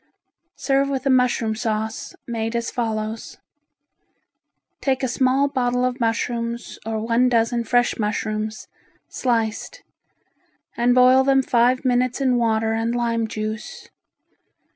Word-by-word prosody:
Serve 275 0 +1
with 270 -1 -3
a 275 - +3
mushroom 245 -3 +2
sauce, 220 -1 -3
made 225 -1 -3
as 235 0 -2
follows: 220 -2 -4 1.4
Take 265 -1 0
a - - +2
small 260 +2 +2
bottle 250 -2 0
of 255 +1 -2
mushrooms 235 0 -2
or 220 -1 -2
one 230 +3 +2
dozen 235 0 +1
fresh 245 +1 +1
mushrooms 215 0 -3 0.4
sliced 230 - -2 0.9
and 245 +1 +2
boil 255 +1 +6
them 270 0 +3
five 250 +2 +2
minutes 250 0 +1
in 260 -2 +2
water 225 -1 +1
and 225 +1 -1
lime 230 -1 0
juice. 215 0 -6
235 Hz, 120 wpm, -22 LUFS, 225-255 Hz, 1.4 s, boil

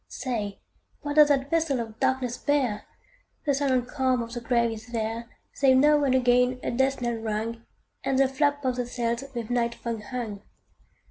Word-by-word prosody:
Say, 215 -6 -4 0.5
what 290 +1 -3
doth 300 -1 +9
that 275 -1 +1
vessel 325 -5 +1
of 225 -1 -6
darkness 255 -2 0
bear? 260 -7 0 0.6
The 285 - +2
silent 265 -3 +1
calm 260 -2 0
of 230 0 -9
the 240 - -4
grave 235 -1 +1
is 220 0 -8
there, 230 0 -3 0.2
Save 265 -2 +4
now 295 +2 +5
and 260 -2 +3
again 250 0 +3
a - - -1
death 265 +2 +1
knell 240 -1 -1
rung, 225 +1 -3 0.4
And 270 - 0
the 270 0 +5
flap 285 +1 0
of 255 -1 0
the 245 -1 -2
sails 235 0 -2
with 235 -1 -4
night 235 -1 +1
fog 230 -2 -4
hung. 230 -5 -5
250 Hz, 185 wpm, -26 LUFS, 235-270 Hz, 0.6 s, doth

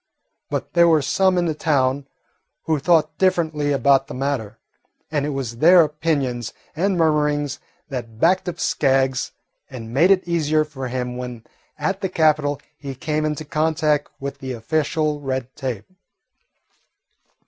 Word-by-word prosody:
But - - -4
there 170 -1 +5
were 160 -3 +4
some 190 +5 +2
in 175 - +2
the 160 - 0
town 140 -3 0 0.6
who 160 -2 0
thought 160 0 +2
differently 160 -6 +1
about 135 -1 +3
the - - -7
matter, 130 -5 -3 0.5
and 145 -2 0
it - - -2
was 130 -5 -4
their 170 +6 +7
opinions 140 -7 -2 0.2
and 190 +3 +1
murmurings 150 -3 +1 0.3
that 120 -5 -6
backed 180 +4 +3
up 175 - -7
Skaggs 135 -2 +1 0.4
and 115 -3 -8
made 165 +8 +4
it 190 -2 +3
easier 155 -2 +1
for 135 -3 -6
him 125 0 -3
when 125 -2 -7 0.3
at 195 +1 -2
the 190 - -1
capital 150 -4 +2 0.2
he 140 -2 -6
came 155 +3 -1
into 155 0 -3
contact 155 0 +1
with 140 0 -6
the 130 -1 -5
official 150 +5 -1
red 130 -2 -4
tape. 125 -7 -4
145 Hz, 150 wpm, -22 LUFS, 130-160 Hz, 0.6 s, their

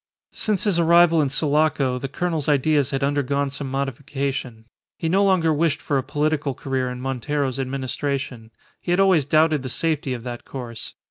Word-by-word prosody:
Since 210 -3 -1
his 195 -5 +2
arrival 170 -1 +5
in 140 - +1
Sulaco 145 -3 +1
the 135 - -4
colonel's 160 +1 -2
ideas 145 -1 +2
had 135 0 -2
undergone 140 0 0
some 140 -1 -5
modification. 135 -3 -3 0.3
He 165 - -2
no 190 +5 +3
longer 180 -5 +3
wished 155 0 +1
for 140 -2 0
a - - -3
political 150 -1 -1
career 130 -1 -2
in 125 0 -6
Montero's 135 +1 -2
administration. 135 -2 -3 0.3
He - - -7
had 175 +2 +2
always 185 -7 +4
doubted 155 0 +3
the 130 - -5
safety 145 -2 -1
of 120 - -8
that 120 -1 -6
course. 120 -4 -8
140 Hz, 175 wpm, -23 LUFS, 130-155 Hz, 0.3 s, arrival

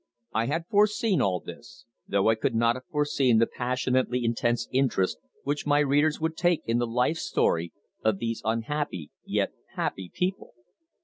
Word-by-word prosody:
I 115 +1 +1
had 165 +5 -1
foreseen 210 +1 +2
all 90 -3 +1
this, - - -12 0.2
though 100 +1 +2
I - - +6
could 110 +2 -1
not 115 +1 +3
have 130 - -9
foreseen 140 -5 +2
the 115 - +5
passionately 125 0 0
intense 120 0 0
interest 130 -8 +1 0.2
which 145 +1 -2
my 145 0 +4
readers 145 +1 +3
would 160 0 -1
take 175 -1 +1
in 115 +1 +1
the 120 - 0
life 125 +7 +1
story 85 - 0 0.3
of 110 -3 +2
these 115 +2 -3
unhappy 115 - -2
yet - - 0 0.2
happy 95 -2 -3
people. 185 -5 -3
125 Hz, 165 wpm, -27 LUFS, 115-150 Hz, 0.3 s, I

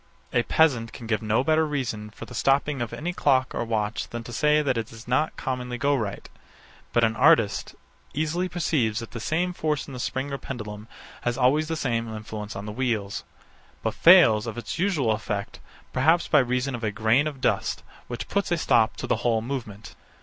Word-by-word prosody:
A 120 - +4
peasant 120 -3 +2
can 120 - -9
give 110 -2 0
no 110 +3 +1
better 160 +2 +3
reason 125 -8 -3
for 105 - -10
the 125 - -12
stopping 135 +2 +1
of 120 - -3
any 175 +4 -4
clock 130 -6 +2
or - - -1
watch 110 -1 -2
than 120 0 -5
to 120 - -9
say 150 +3 +3
that 130 -3 +1
it 115 -1 -2
does 115 +1 -13
not 140 +6 +1
commonly 125 -1 -3
go 140 +4 +2
right: 105 -6 -4 0.6
But 120 - +2
an 110 0 +2
artist 110 -1 +3 0.4
easily 160 +5 -1
perceives 140 -11 0
that 115 -1 -5
the 120 - -6
same 175 +9 -1
force 155 -4 -1
in 140 - -10
the 125 - -6
spring 130 +3 -3
or 140 - -3
pendulum 105 -4 -7 0.3
has 120 0 -1
always 140 +5 +3
the 165 - -2
same 115 -6 -1
influence 105 0 -7
on 100 +1 -6
the 105 - -5
wheels; 110 -4 -2 0.6
but - - 0
fails 120 - +6
of 115 - -5
its 120 +6 -5
usual 165 - +1
effect, 105 -2 -3 0.3
perhaps 160 +7 +3
by 150 - +5
reason 125 +1 0
of 120 -1 -5
a 110 - +1
grain 110 +7 +2
of 145 -3 -6
dust, - - 0 0.2
which 120 - -5
puts 200 -3 -1
a 175 - +3
stop 115 -8 +2
to - - -4
the - - +1
whole 115 -1 +1
movement. 115 -4 -6
125 Hz, 205 wpm, -25 LUFS, 110-145 Hz, 0.6 s, fails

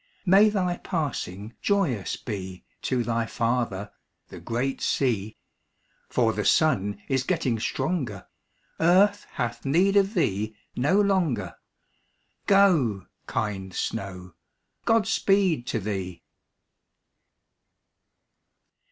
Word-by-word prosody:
May 200 +3 +6
thy 180 -4 0
passing 115 - -4
joyous 170 - 0
be 95 -4 -6 0.2
To 125 -2 0
thy 115 -1 -1
father, 115 -5 -1 0.4
the - - -9
great 125 +4 -2
sea, 110 -6 0 0.7
For 115 -3 +2
the - - -2
sun 100 -11 +2
is 135 -2 +1
getting 125 -2 0
stronger; 115 - -2 0.5
Earth 195 +5 +4
hath 120 -1 -3
need 180 +8 +3
of 200 +2 +3
thee 110 - 0 0.2
no 150 +11 +2
longer; 170 - +1 0.9
Go, 165 - +4 0.2
kind 95 -3 -3
snow, 90 -5 -4 0.5
God 225 -1 +3
speed 190 -10 +2
to 115 - -1
thee! 95 -4 -4
125 Hz, 100 wpm, -26 LUFS, -, 0.9 s, May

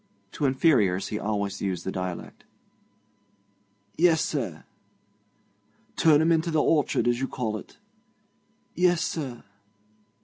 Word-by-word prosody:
To 150 - -2
inferiors 125 - +2
he 105 - -3
always 100 -2 -2
used 95 -3 -3
the 95 - -2
dialect. 90 -2 -6 1.6
'Yes, 165 -2 +5
sir.' 115 - -4 1.3
'Turn 155 -2 +5
'em 165 +1 +3
into 165 +1 +2
th' - - -3
orchard, 150 -4 +2
as 120 0 +1
you 135 - -1
call 115 -5 -3
it.' 105 - -10 1.0
'Yes, 175 -1 +2
sir.' 135 -7 -4
130 Hz, 115 wpm, -26 LUFS, 100-160 Hz, 1.6 s, Yes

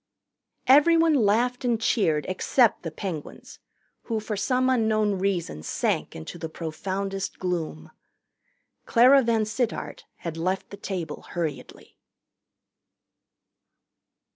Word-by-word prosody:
Everyone 325 +4 +5
laughed 245 +1 +2
and 240 -3 +1
cheered 165 - +1
except 220 +5 +2
the 165 - -4
Penguins, 160 -1 -7 0.5
who 225 -2 -1
for 215 0 -4
some 250 +6 +1
unknown 215 -5 +2
reason 180 - -1
sank - - -1
into 80 - -8
the 160 0 -5
profoundest 195 +5 -4
gloom. 165 - -4 1.0
Clara 255 +4 +6
VanSittart 225 0 -1
had 165 -1 -6
left 185 +3 -2
the 200 - -8
table 180 -5 -5
hurriedly. 165 -4 -5
200 Hz, 100 wpm, -25 LUFS, 170-235 Hz, 1.0 s, Clara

